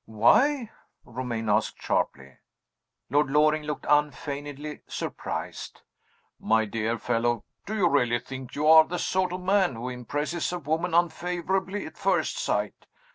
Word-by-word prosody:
"Why?" 230 - +3 0.3
Romayne 120 -2 -4
asked, 105 +1 +1
sharply. 70 0 -2 0.7
Lord 145 0 +3
Loring 155 +2 +3
looked 150 -1 -5
unfeignedly 145 0 -1
surprised. - - -5 0.6
"My 110 +1 +2
dear 115 +2 -2
fellow, 120 0 0 0.2
do 215 - -3
you 195 -5 +3
really 125 -6 +2
think 130 +1 -9
you 150 - -1
are 160 0 +9
the 180 - -4
sort 185 0 0
of 180 +1 -4
man 190 - +2
who 120 +3 -5
impresses 145 +8 -3
a 180 - -2
woman 165 +2 -1
unfavorably 180 +3 0
at - - -11
first - - +1
sight? - - -2
150 Hz, 135 wpm, -27 LUFS, 120-175 Hz, 0.7 s, are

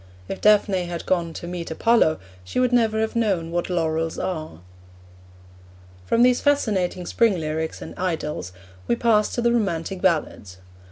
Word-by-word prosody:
If - - -6
Daphne 205 -3 +3
had 170 -1 -6
gone 170 -3 0
to - - -7
meet 175 -1 -5
Apollo, 160 -1 +3 0.3
she 90 - -3
would 250 -1 +2
never 220 -2 +2
have 220 +2 -2
known 190 -8 0
what 175 +1 -2
laurels 165 -2 -1
are. 155 - -4 1.5
From 235 - +3
these 250 0 +4
fascinating 195 -11 +1
spring 215 -1 +2
lyrics 160 0 -3
and - - -9
idylls 160 - -3 0.4
we 120 - +2
pass 215 - +2
to 240 - -1
the 235 0 +3
romantic 190 -4 -1
ballads. 155 - -1
180 Hz, 155 wpm, -23 LUFS, 165-220 Hz, 1.5 s, these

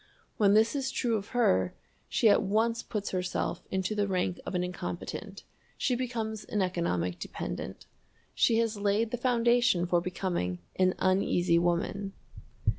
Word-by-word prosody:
When 205 -1 +5
this 220 +4 +4
is 270 -1 -1
true 240 -4 0
of 205 -2 -3
her, 95 - +2 0.3
she 230 - +3
at 205 - +6
once 225 +4 +1
puts 210 -3 -4
herself 180 -1 -2
into 190 +2 -1
the 205 -1 0
rank 185 -1 -1
of - - -3
an 180 - +1
incompetent 180 +2 -5 0.3
she 255 - +1
becomes 230 -4 -3
an 210 - -3
economic 90 - -1
dependent. - - -6 0.5
She 225 - +3
has 225 -2 +1
laid 205 +3 +1
the 245 - -1
foundation 240 -5 +3
for 175 -1 +2
becoming 175 - -2 0.2
an 185 -1 +3
Uneasy 185 -2 +2
Woman. 175 +3 -1
200 Hz, 150 wpm, -29 LUFS, 180-230 Hz, 0.5 s, at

